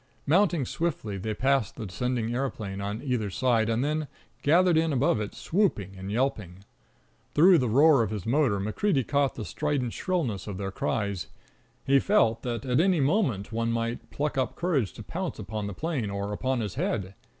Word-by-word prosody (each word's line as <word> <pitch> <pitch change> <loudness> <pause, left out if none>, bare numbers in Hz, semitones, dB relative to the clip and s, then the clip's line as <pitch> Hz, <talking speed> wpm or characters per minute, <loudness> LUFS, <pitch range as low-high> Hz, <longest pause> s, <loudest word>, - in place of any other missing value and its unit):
Mounting 170 -2 +3
swiftly, 115 - -3
they 110 +3 -3
passed 135 -3 +1
the 115 - -6
descending 120 +3 -2
aeroplane 110 -7 -3
on 105 +3 -4
either 125 -7 -1
side, 115 0 +1
and 115 +2 +1
then 155 0 -1 0.3
gathered 175 +4 +4
in 160 0 +2
above 135 -3 +2
it, 105 - -5
swooping 155 - 0
and 95 +1 -6
yelping. 105 -6 -2 0.7
Through 175 +3 +7
the 125 -3 0
roar 140 +3 +6
of 110 - 0
his 105 -4 -5
motor 120 -5 +2
MacCreedy 130 - 0
caught 140 -2 +1
the 110 - -5
strident 145 -4 -2
shrillness 155 - -2
of 100 -3 -5
their 100 0 -4
cries. 100 -4 -2 0.6
He 135 0 +5
felt 115 - +2
that 120 +2 -4
at 125 +1 +2
any 180 0 +3
moment 135 - +1
one 115 +1 -1
might 115 +1 -3
pluck 145 -1 -2
up 130 - -1
courage 150 - 0
to 110 - -9
pounce 180 - -4
upon 105 0 -4
the 100 - -6
plane 150 - -2
or 100 +1 -3
upon 130 +3 -1
his 105 -4 -3
head. 95 -3 -2
120 Hz, 185 wpm, -27 LUFS, 105-150 Hz, 0.7 s, Through